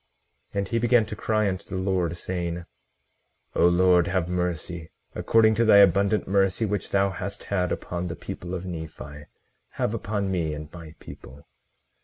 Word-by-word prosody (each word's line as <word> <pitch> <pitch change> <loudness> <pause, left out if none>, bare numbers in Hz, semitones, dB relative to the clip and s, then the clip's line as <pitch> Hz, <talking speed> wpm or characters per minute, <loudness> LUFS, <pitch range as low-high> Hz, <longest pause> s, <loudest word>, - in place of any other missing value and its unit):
18:41 - - -2
And 100 -1 0
he 115 - +1
began 120 -1 +4
to 105 - -6
cry 110 0 0
unto 95 -1 -4
the - - -5
Lord, 95 -3 -1
saying: 85 -1 -4 0.9
O - - +4
Lord, 90 0 +4
have 95 -3 0
mercy; 90 -2 -3 0.2
according 110 -1 +3
to 115 - +2
thy 110 -3 +6
abundant 100 +2 +4
mercy 95 +2 +2
which 105 -2 -2
thou 100 0 +2
hast 95 +2 -6
had 90 -2 +1
upon 90 0 -3
the 85 - -5
people 90 +1 -6
of 90 0 -5
Nephi, 80 -4 -8 0.5
have 105 - -1
upon 105 -3 -2
me, 80 -5 -1
and 75 0 -9
my 80 -2 -10
people. 70 +2 -12
95 Hz, 170 wpm, -25 LUFS, 85-100 Hz, 0.9 s, thy